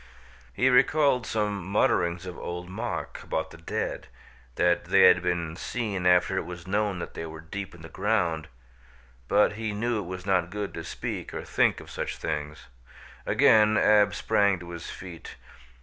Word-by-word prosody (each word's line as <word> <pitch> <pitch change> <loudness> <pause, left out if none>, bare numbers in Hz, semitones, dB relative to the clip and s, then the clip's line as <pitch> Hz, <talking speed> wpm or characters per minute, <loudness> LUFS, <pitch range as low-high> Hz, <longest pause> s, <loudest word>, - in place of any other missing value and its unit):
He 125 - +1
recalled 130 -1 +4
some 105 -3 -1
mutterings 85 -2 +1
of 90 -1 -6
Old 90 +1 -6
Mok 110 +6 -5
about 80 - -3
the - - -11
dead, 80 - -4 0.5
that 85 0 +2
they - - +4
had - - +7
been 85 -2 -2
seen 100 -3 -2
after 90 +1 +4
it - - -1
was 90 -1 -8
known 100 0 0
that 85 - -6
they 80 - -5
were 80 0 -9
deep 90 +3 -7
in 80 - -14
the - - -8
ground, 85 -4 0 0.8
but 105 +4 +3
he 110 0 -3
knew 115 +2 -1
it 95 - -6
was 90 0 -6
not 90 -3 +1
good 105 +1 -4
to - - -6
speak - - -5
or - - -4
think - - +2
of - - -12
such - - -4
things. 75 -3 -4 0.6
Again 110 0 +5
Ab 105 -1 +4
sprang 100 -2 +2
to 85 0 -9
his 85 -1 -7
feet. 90 -3 -9
95 Hz, 175 wpm, -27 LUFS, 85-105 Hz, 0.8 s, had